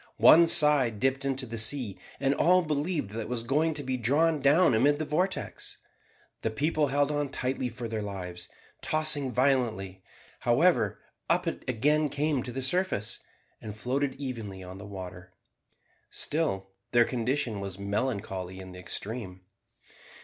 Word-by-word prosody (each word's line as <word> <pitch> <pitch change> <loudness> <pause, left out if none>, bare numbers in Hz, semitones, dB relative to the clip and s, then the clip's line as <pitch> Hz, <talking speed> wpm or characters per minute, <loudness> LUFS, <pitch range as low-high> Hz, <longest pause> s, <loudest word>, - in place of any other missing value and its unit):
One 170 +1 +7
side 150 -9 +5
dipped 135 +2 0
into 135 -1 -2
the 115 -1 -5
sea, 115 -3 +2 0.2
and 135 +1 +2
all 180 +5 +4
believed 150 - -2
that 110 - -5
it 110 - -6
was 120 -2 -2
going 150 +6 +1
to 145 - -3
be 130 -1 -2
drawn 150 +7 +2
down 145 +2 +4
amid 140 +6 +3
the 155 - -3
vortex. 180 +6 -1 0.6
The 110 - 0
people 150 +6 0
held 145 +2 +1
on 145 -1 -1
tightly 130 -1 -2
for 120 +1 -6
their 110 -1 -3
lives. 90 -3 -6 0.3
Tossing 150 -4 +2
violently, 120 -8 0 0.4
however, - - +2 0.3
up - - +2
it - - -4
again 150 +5 +2
came 145 -1 0
to 125 - -6
the 130 +2 -4
surface, 175 - 0 0.4
and 105 -1 -8
floated 130 +4 -1
evenly 110 -9 -6
on 90 +1 -9
the 105 - -9
water. 90 -2 -9 0.8
Still 95 -12 -2 0.2
their 120 0 +6
condition 120 -2 -2
was 100 -1 -5
melancholy 100 -3 -3
in 95 -1 -9
the 90 - -10
extreme. 95 0 -5
130 Hz, 155 wpm, -28 LUFS, 105-145 Hz, 0.8 s, One